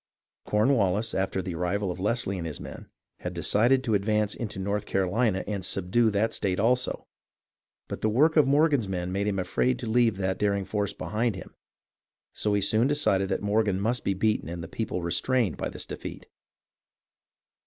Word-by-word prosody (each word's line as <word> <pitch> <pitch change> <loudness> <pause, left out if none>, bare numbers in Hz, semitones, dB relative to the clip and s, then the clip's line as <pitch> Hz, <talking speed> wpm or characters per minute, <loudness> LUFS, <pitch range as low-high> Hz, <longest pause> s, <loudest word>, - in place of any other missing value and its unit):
Cornwallis, 105 -2 +2
after 95 0 -1
the 90 - -4
arrival 90 +3 -1
of 90 - -7
Leslie 100 -1 0
and 85 - -4
his 75 - -5
men, - - -9 0.3
had 90 0 -5
decided 120 +9 +3
to 115 - 0
advance 105 +1 +1
into 110 -5 -5
North 100 +2 -2
Carolina 95 +2 +1
and 100 -3 -3
"subdue" 95 +6 +1
that 105 +2 0
state 95 -1 -1
also; 125 +4 +1 0.8
but - - -6
the 110 - +2
work 150 +9 +3
of 150 -4 +5
Morgan's 145 -5 +3
men 90 -1 -3
made 100 +2 -1
him 100 -2 0
afraid 105 +7 0
to 120 - -6
leave 115 -2 +2
that 95 -1 -1
daring 100 -1 +1
force 100 -1 -1
behind 105 +5 -1
him, 95 - -10 0.8
so 105 -1 0
he 100 - +1
soon 110 +5 +3
decided 100 -10 +2
that 95 - -2
Morgan 105 -2 +1
must 115 +5 -1
be 100 - 0
beaten 105 -3 0
and 85 0 -5
the - - -6
people 90 -2 -3
restrained 100 +4 +1
by - - -3
his - - -6
defeat. - - -8
105 Hz, 180 wpm, -27 LUFS, 95-115 Hz, 0.8 s, of